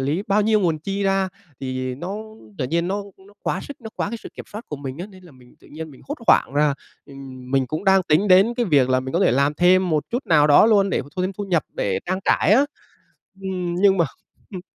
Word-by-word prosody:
lý 145 Hz, +8 st, -1 dB
bao 205 Hz, +2 st, +3 dB
nhiêu 215 Hz, 0 st, +3 dB
nguồn 165 Hz, -4 st, +1 dB
chi 195 Hz, +6 st, -3 dB
ra, 195 Hz, -1 st, +1 dB, 0.3 s
thì 130 Hz, -1 st, -3 dB
nó 175 Hz, +9 st, -5 dB, 0.4 s
tự -, -, -1 dB
nhiên 170 Hz, +5 st, -1 dB
nó 200 Hz, +2 st, -2 dB, 0.2 s
nó 205 Hz, -, -19 dB
quá -, -, -1 dB
sức, 285 Hz, -, -10 dB
nó 220 Hz, -2 st, -8 dB
quá -, -, -1 dB
cái 235 Hz, -, -4 dB
sự -, -, -10 dB
kiểm -, -, -9 dB
soát 215 Hz, +3 st, -7 dB
của 150 Hz, -, -5 dB
mình 135 Hz, +1 st, -7 dB
á. 180 Hz, -, -5 dB
Nên 190 Hz, -3 st, -16 dB
là 170 Hz, -, -15 dB
mình 125 Hz, -1 st, -20 dB
tự -, -, -19 dB
nhiên 160 Hz, +1 st, -8 dB
mình 135 Hz, -, -16 dB
hốt 290 Hz, -, -4 dB
hoảng -, -, +4 dB
ra, 145 Hz, -1 st, +3 dB, 0.3 s
ừm, 135 Hz, -2 st, -11 dB
mình 135 Hz, -1 st, +1 dB
cũng 155 Hz, +9 st, -4 dB
đang 190 Hz, 0 st, +5 dB
tính 175 Hz, +5 st, +2 dB
đến 195 Hz, +6 st, +5 dB
cái 240 Hz, -2 st, 0 dB
việc 140 Hz, -7 st, +3 dB
là 130 Hz, 0 st, +2 dB
mình 130 Hz, 0 st, -6 dB
có 175 Hz, -, +1 dB
thể -, -, +4 dB
làm 140 Hz, +4 st, +2 dB
thêm 180 Hz, +3 st, +4 dB
một 155 Hz, -2 st, +1 dB
chút 245 Hz, +4 st, -3 dB
nào 150 Hz, -3 st, +4 dB
đó 145 Hz, +8 st, +6 dB
luôn, 200 Hz, -3 st, +3 dB
để -, -, 0 dB
mà 140 Hz, -, -14 dB
thu 185 Hz, -, 0 dB
thêm 190 Hz, +1 st, -1 dB
thu 205 Hz, +2 st, -5 dB
nhập 175 Hz, -6 st, +1 dB
để 95 Hz, -2 st, -1 dB
trang 185 Hz, +1 st, -1 dB
trải -, -, +3 dB
á. 265 Hz, +6 st, +5 dB, 0.8 s
Ừm, 180 Hz, -2 st, -3 dB
nhưng 195 Hz, +1 st, +4 dB
mà 170 Hz, -, +3 dB, 0.5 s
hừm. 185 Hz, -, -5 dB
175 Hz, 265 wpm, -22 LUFS, 140-195 Hz, 0.8 s, đó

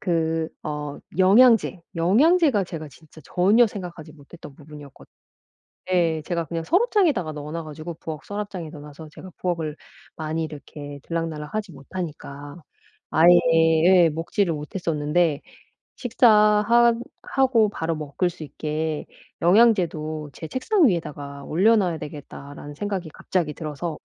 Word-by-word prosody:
그 165 Hz, -3 st, 0 dB
어 150 Hz, -1 st, -5 dB, 0.2 s
영양제, 215 Hz, +1 st, +5 dB, 0.2 s
영양제가 245 Hz, -, +4 dB
제가 160 Hz, -3 st, -7 dB
진짜 155 Hz, +3 st, -17 dB
전혀 205 Hz, +7 st, +4 dB
생각하지 175 Hz, -6 st, -8 dB
못했던 145 Hz, 0 st, -13 dB
부분이었거든 145 Hz, -1 st, -14 dB, 0.8 s
예. 165 Hz, -3 st, +2 dB
제가 170 Hz, -2 st, -2 dB
그냥 165 Hz, 0 st, -4 dB
서랍장에다가 345 Hz, -, +2 dB
넣어놔 150 Hz, +3 st, -6 dB
가지고 155 Hz, +2 st, -7 dB
부엌 155 Hz, -2 st, -6 dB
서랍장에 205 Hz, -5 st, -5 dB
넣어놔서 150 Hz, 0 st, -11 dB
제가 185 Hz, -, -11 dB
부엌을 165 Hz, -4 st, -2 dB, 0.4 s
많이 160 Hz, +1 st, -3 dB
이렇게 145 Hz, -1 st, -8 dB
들락날락 165 Hz, -2 st, -4 dB
하지 215 Hz, -3 st, -3 dB
못하니까, 145 Hz, -2 st, -8 dB, 0.6 s
아예 175 Hz, +2 st, +7 dB, 0.5 s
예. 180 Hz, -2 st, +6 dB
먹지를 165 Hz, +3 st, -1 dB
못했었는데 150 Hz, 0 st, -1 dB, 0.5 s
'식사 245 Hz, 0 st, +2 dB
하 215 Hz, +3 st, +5 dB, 0.3 s
하고 250 Hz, -5 st, +2 dB
바로 165 Hz, -4 st, -3 dB
먹을 155 Hz, +4 st, -2 dB
수 170 Hz, -2 st, -10 dB
있게 155 Hz, +1 st, -3 dB, 0.4 s
영양제도 170 Hz, -6 st, +2 dB
제 160 Hz, -, -8 dB
책상 320 Hz, -, +2 dB
위에다가 145 Hz, -6 st, -4 dB
올려놔야 190 Hz, 0 st, +2 dB
되겠다.'라는 145 Hz, -1 st, -9 dB
생각이 190 Hz, -2 st, -4 dB
갑자기 170 Hz, -5 st, -2 dB
들어서 155 Hz, +1 st, -5 dB
165 Hz, 315 characters per minute, -23 LUFS, 150-195 Hz, 0.8 s, 아예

